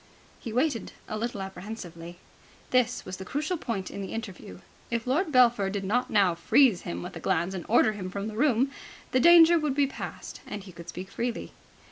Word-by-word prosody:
He 230 - -6
waited 250 0 0
a - - -4
little 215 -2 -3
apprehensively. 180 -3 -8 0.5
This 250 -2 +2
was 185 0 -6
the 190 - -7
crucial 305 - -2
point 220 - -4
in 200 - -6
the 190 - -6
interview. 185 - -7 0.3
If 235 -1 -2
Lord 305 +7 +1
Belpher 240 -6 +4
did 200 0 -3
not 230 +6 0
now 200 -5 +4
freeze 225 +3 +4
him 85 +1 -5
with - - -8
a - - -6
glance 175 +4 0
and 180 -3 -6
order 220 -1 +5
him 195 -3 -6
from 200 +2 -4
the 215 - -6
room, 260 +1 +2 0.4
the 255 - +3
danger 340 +3 +8
would 300 -3 -1
be 285 0 +4
past, 275 - -7
and 205 -2 -6
he 190 - -11
could 170 0 -11
speak 185 +2 -7
freely. 240 0 -3
215 Hz, 200 wpm, -27 LUFS, 190-255 Hz, 0.5 s, danger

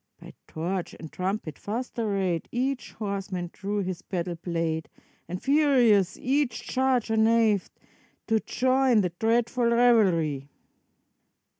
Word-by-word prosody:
By - - -12
torch 175 +3 -4
and 160 - -9
trumpet 185 -4 -3
fast 235 +4 -5
arrayed, 195 -6 -1
Each 255 +2 -2
horseman 195 -4 -4
drew 205 +1 -3
his 185 -1 -4
battle 180 -2 -3
blade. 165 -2 -3 0.4
And 180 +2 -5
furious 250 - +3
each 270 -1 0
charger 255 -4 0
neighed, 220 -3 +3 0.6
To 225 -1 +2
join 255 -1 +2
the 180 -3 -2
dreadful 235 +2 +1
revelry. 185 - +3
210 Hz, 115 wpm, -26 LUFS, 180-240 Hz, 0.6 s, furious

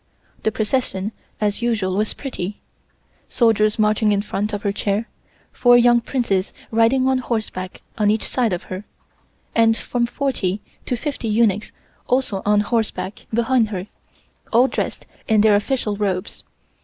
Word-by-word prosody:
The 220 - +1
procession 215 -2 -1 0.3
as 210 +1 0
usual 210 -6 0
was 210 +2 0
pretty, 205 -8 -5 0.7
soldiers 215 -3 +3
marching 215 0 +3
in 200 0 +1
front 210 0 -2
of 205 -1 -4
her 200 - +1
chair, 205 +2 -1 0.4
four 245 -1 +5
young 240 0 +5
Princes 205 -8 -1 0.2
riding 230 +4 +3
on 265 -1 +2
horseback 215 -7 -4 0.2
on 210 -1 +3
each 215 +1 +1
side 245 -4 0
of 175 - -2
her, 185 +2 -6 0.7
and 225 -1 +4
from 240 -1 -1
forty 235 -8 -1 0.3
to 250 - 0
fifty 280 -2 -3
eunuchs 215 -2 +2 0.4
also 250 -7 +1
on 210 0 +4
horseback 215 -2 -2
behind 235 0 +2
her, 190 -3 -4 0.7
all 245 +3 +5
dressed - - -3 0.2
in 220 -2 +4
their 210 -1 +5
official 210 0 0
robes. 195 -3 -2
215 Hz, 145 wpm, -21 LUFS, 205-240 Hz, 0.7 s, four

